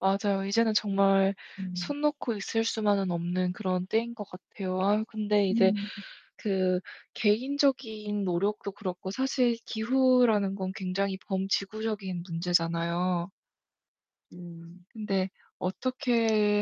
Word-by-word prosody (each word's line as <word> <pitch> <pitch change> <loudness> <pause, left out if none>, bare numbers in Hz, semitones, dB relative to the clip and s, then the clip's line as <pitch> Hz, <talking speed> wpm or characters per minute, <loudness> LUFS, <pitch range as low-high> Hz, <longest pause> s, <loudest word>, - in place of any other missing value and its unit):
맞아요. 195 0 +1
이제는 220 +2 +2
정말 195 -1 +3 0.4
손 285 +12 -3
놓고 290 -6 0
있을 225 +3 -1
수만은 205 -4 +1
없는 180 +1 -1
그런 185 -3 -2
때인 230 +4 0
것 210 -3 -6
같아요. 185 0 -5
아유 210 +3 +2
근데 210 -2 +1
이제 195 -1 +5 0.6
그 185 -3 +1 0.4
개인적인 220 -3 +1
노력도 200 +3 -1
그렇고 190 -2 -5
사실 255 0 +1
기후라는 235 -4 +3
건 190 -1 -3
굉장히 190 +1 -1
범지구적인 195 -1 -2
문제잖아요. 170 +1 0 1.1
음 175 0 -12
근데 195 -4 -1 0.3
어떻게 225 -1 +1
200 Hz, 250 characters per minute, -29 LUFS, 185-220 Hz, 1.1 s, 이제